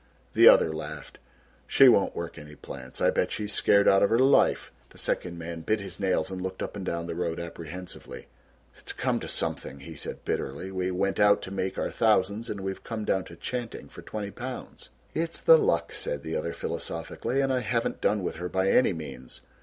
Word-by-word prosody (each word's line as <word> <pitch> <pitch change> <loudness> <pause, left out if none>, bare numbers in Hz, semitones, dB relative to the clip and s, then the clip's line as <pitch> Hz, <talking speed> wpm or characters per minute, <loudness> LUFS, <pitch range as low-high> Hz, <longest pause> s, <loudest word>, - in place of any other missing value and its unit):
The - - +7
other 80 - +5
laughed. 75 -2 -7 0.5
"She 135 - +7
won't 100 -6 +4
work 85 0 -5
any 75 0 -11
plants. 65 -2 -8
I - - +4
bet - - 0
she's 105 -1 -3
scared 100 0 +4
out 95 - +6
of 100 - +4
her 115 - +3
life." 135 +2 +4 0.2
The - - -17
second 85 -1 -2
man 85 0 -6
bit 110 +6 0
his 100 - -6
nails 95 -3 0
and 95 -1 -5
looked 95 0 -4
up - - -5
and 100 - -5
down 85 -2 -2
the 85 - -4
road, 85 -1 -2
apprehensively. 85 +1 -8 0.5
"It's - - -8
come - - 0
to - - -6
something," 70 +1 -3
he 80 +3 -9
said - - -6
bitterly; 70 +8 -3
"we 95 -1 -1
went 95 +2 -1
out 105 -1 +5
to 95 - -7
make 95 -1 -2
our - - -1
thousands 105 0 +2
and 100 - -4
we've 95 0 -4
come 110 -2 -4
down 95 -1 0
to 85 - -11
'chanting' 120 +5 -5
for - - -11
20 105 -2 -5
pounds." 125 +3 -8 0.2
"It's 165 +1 -2
the - - +7
luck," 450 +3 +1
said - - -3
the - - -4
other - - -2
philosophically, 460 - -3
"and 135 -1 +2
I 130 - +2
haven't 115 0 -1
done 105 -2 +1
with - - -3
her 90 +1 -4
by 95 +1 +1
any 125 - +4
means. 70 -6 -9
95 Hz, 210 wpm, -27 LUFS, 85-110 Hz, 0.5 s, The